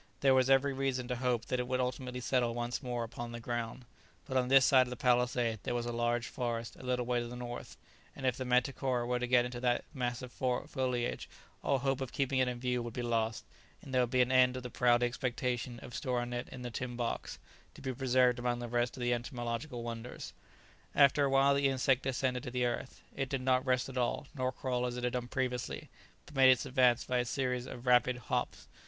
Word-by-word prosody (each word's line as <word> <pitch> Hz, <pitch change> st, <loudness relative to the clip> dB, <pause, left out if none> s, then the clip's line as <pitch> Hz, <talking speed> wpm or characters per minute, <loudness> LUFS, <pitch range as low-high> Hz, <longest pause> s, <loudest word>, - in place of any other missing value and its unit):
There 135 Hz, -1 st, +5 dB
was 130 Hz, 0 st, +4 dB
every 135 Hz, +1 st, +4 dB
reason 130 Hz, -2 st, -1 dB
to 125 Hz, -, 0 dB
hope 125 Hz, -2 st, 0 dB
that 125 Hz, -, -1 dB
it 125 Hz, -, -2 dB
would 130 Hz, 0 st, 0 dB
ultimately 125 Hz, 0 st, -2 dB
settle 120 Hz, -2 st, +1 dB
once 120 Hz, 0 st, -2 dB
more 120 Hz, -3 st, -2 dB
upon 120 Hz, +1 st, -6 dB
the 120 Hz, -, -6 dB
ground, 120 Hz, +1 st, -4 dB, 0.4 s
but 130 Hz, -, -5 dB
on 125 Hz, -1 st, +2 dB
this 135 Hz, 0 st, +6 dB
side 130 Hz, -2 st, +5 dB
of -, -, -7 dB
the 125 Hz, -, -4 dB
palisade 125 Hz, -2 st, +1 dB
there 120 Hz, -, -2 dB
was 120 Hz, -1 st, -1 dB
a 120 Hz, -, -2 dB
large 120 Hz, 0 st, 0 dB
forest 120 Hz, -2 st, -3 dB
a -, -, -13 dB
little 125 Hz, -1 st, -1 dB
way 120 Hz, 0 st, +1 dB
to 120 Hz, -, -3 dB
the 120 Hz, -, -7 dB
north, 120 Hz, 0 st, -7 dB, 0.4 s
and 135 Hz, -, -6 dB
if 125 Hz, -2 st, +2 dB
the 130 Hz, -, -4 dB
manticora 125 Hz, 0 st, +1 dB
were 125 Hz, 0 st, 0 dB
to 125 Hz, -, -1 dB
get 120 Hz, -1 st, +4 dB
into 125 Hz, 0 st, -5 dB
its 120 Hz, -1 st, +1 dB
mass 125 Hz, -2 st, -2 dB
of 125 Hz, -, -8 dB
foliage 125 Hz, -1 st, -2 dB, 0.3 s
all 140 Hz, -, +2 dB
hope 135 Hz, 0 st, -1 dB
of 130 Hz, -, -4 dB
keeping 135 Hz, -1 st, 0 dB
it 130 Hz, -, +3 dB
in 125 Hz, -1 st, -3 dB
view 125 Hz, 0 st, 0 dB
would 120 Hz, -1 st, -6 dB
be 125 Hz, -, -2 dB
lost, 115 Hz, -1 st, -1 dB, 0.4 s
and 135 Hz, -, -9 dB
there 130 Hz, -, +4 dB
would 125 Hz, -, +1 dB
be 125 Hz, 0 st, +4 dB
an 125 Hz, -, -2 dB
end 130 Hz, 0 st, +5 dB
of 130 Hz, -, -6 dB
the 125 Hz, -, -6 dB
proud 120 Hz, 0 st, +3 dB
expectation 120 Hz, -1 st, -2 dB
of 120 Hz, -, -10 dB
storing 120 Hz, -2 st, -2 dB
it 120 Hz, 0 st, -4 dB
in 125 Hz, -, -8 dB
the 120 Hz, -, -5 dB
tin 125 Hz, +1 st, -4 dB
box, 120 Hz, -1 st, -3 dB, 0.4 s
to -, -, -12 dB
be 130 Hz, -, -2 dB
preserved 125 Hz, -1 st, +3 dB
among 120 Hz, 0 st, 0 dB
the 120 Hz, 0 st, -5 dB
rest 120 Hz, +1 st, 0 dB
of -, -, -6 dB
the 120 Hz, 0 st, +2 dB
entomological 120 Hz, +1 st, -4 dB
wonders. 115 Hz, +1 st, -6 dB, 0.6 s
After 140 Hz, 0 st, +5 dB
a -, -, +1 dB
while 135 Hz, +1 st, +5 dB
the 140 Hz, 0 st, +3 dB
insect 130 Hz, -1 st, +2 dB
descended 130 Hz, -1 st, -1 dB
to 130 Hz, -, -6 dB
the 125 Hz, 0 st, 0 dB
earth; 120 Hz, +2 st, -4 dB
it 135 Hz, -1 st, -2 dB
did 135 Hz, -1 st, -1 dB
not 130 Hz, 0 st, +2 dB
rest 130 Hz, 0 st, +2 dB
at 130 Hz, -1 st, -4 dB
all, 120 Hz, +3 st, 0 dB
nor 130 Hz, -3 st, -1 dB
crawl 125 Hz, -1 st, -1 dB
as 120 Hz, 0 st, -4 dB
it 125 Hz, -, -5 dB
had 125 Hz, -, 0 dB
done 125 Hz, -1 st, -2 dB
previously, 125 Hz, -1 st, -3 dB, 0.3 s
but -, -, -14 dB
made 135 Hz, -2 st, +6 dB
its 130 Hz, -2 st, +4 dB
advance 125 Hz, -2 st, +3 dB
by 125 Hz, -1 st, 0 dB
a -, -, +2 dB
series 125 Hz, 0 st, -1 dB
of 120 Hz, +1 st, -8 dB
rapid 125 Hz, 0 st, +4 dB
hops. 120 Hz, -, -3 dB
125 Hz, 240 wpm, -33 LUFS, 120-130 Hz, 0.6 s, this